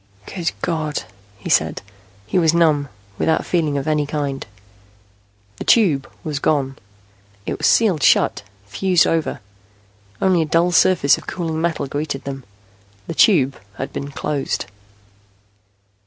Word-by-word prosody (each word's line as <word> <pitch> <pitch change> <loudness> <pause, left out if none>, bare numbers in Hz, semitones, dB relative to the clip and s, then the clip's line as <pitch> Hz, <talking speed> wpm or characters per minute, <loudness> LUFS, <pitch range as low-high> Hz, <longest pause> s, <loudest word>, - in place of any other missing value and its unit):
"Good 175 -3 -3
God," 155 -3 -2 0.3
he - - -9
said. - - +1 0.4
He 145 - +1
was 165 -1 +3
numb, 150 -5 +3 0.3
without 160 - +1
feeling 155 -5 0
of 140 - -3
any 150 -2 +1
kind. 140 -2 -3 1.1
The - - -5
Tube 165 - +3
was 150 -2 -3
gone. 135 -3 0 0.7
It - - -4
was - - +2
sealed 195 -10 +3
shut, - - +3 0.2
fused 180 - +2
over. 160 -7 -1 0.8
Only 185 -3 +3
a - - +1
dull 165 +3 +2
surface 170 -4 +4
of - - -16
cooling 160 -3 -3
metal 165 -3 -1
greeted 145 0 -4
them. 135 -2 -6 0.6
The - - -5
Tube 145 - +3 0.2
had 135 - -6
been 140 - -5
closed. 145 0 -3
155 Hz, 135 wpm, -20 LUFS, 140-170 Hz, 1.1 s, surface